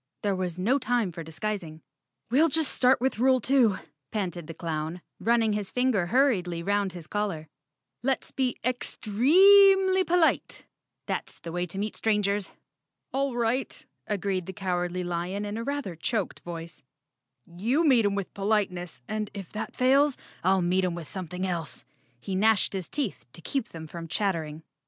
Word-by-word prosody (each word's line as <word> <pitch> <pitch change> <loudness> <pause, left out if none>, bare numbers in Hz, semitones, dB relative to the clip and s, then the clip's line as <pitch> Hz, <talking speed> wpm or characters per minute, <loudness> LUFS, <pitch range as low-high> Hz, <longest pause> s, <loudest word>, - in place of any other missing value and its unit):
There 200 -2 +1
was 180 -2 -3
no 235 +10 +2
time 240 -6 0
for 165 0 -7
dis¬ 160 0 -11
guising. 180 -7 -3 0.5
"We'll 310 +6 +5
just 315 0 +2
start 255 +1 +4
with 255 -3 -1
rule 260 +1 +4
two," 250 -7 +3 0.3
panted 175 -6 -3
the 165 - -7
clown, 160 +1 -4 0.2
running 230 -2 +2
his 205 -2 -3
finger 250 -8 +1
hurriedly 185 -8 +2
'round 200 -1 0
his 175 -3 -8
collar. 190 -4 -3 0.5
"Let's 265 +1 -1
be 255 -2 -1
ex—tre—eemly 375 - +5
polite. 340 -1 +1 0.4
That's - - -4
the 165 - -8
way 175 +1 -2
to 180 - -8
meet 210 +2 -2
strangers." 205 -2 0 0.6
"All 270 -1 0
right," 240 +2 -1 0.2
agreed 195 -3 -1
the 190 - -5
Cowardly 180 -2 -2
Lion 175 +4 -3
in 205 +1 -4
a 230 - -3
rather 280 -9 -3
choked 210 +5 -2
voice, 170 -1 -8 0.6
"you 230 - 0
meet 250 -5 +5
'em 200 -1 +1
with 200 -2 -4
politeness, 190 - -1
and 215 -1 -3
if 195 -4 -7
that 215 - -5
fails, 275 +2 +4 0.3
I'll 190 0 +3
meet 185 +2 +2
'em 180 -2 0
with 170 -3 -7
something 185 -1 -4
else." 170 -6 -4 0.3
He 190 - -5
gnashed 210 +2 +3
his 185 -4 -4
teeth 280 -9 -3
to - - -13
keep 270 - -2
them 160 -1 -8
from 165 +1 -8
chattering. 160 -5 -2
200 Hz, 165 wpm, -27 LUFS, 175-250 Hz, 0.6 s, We'll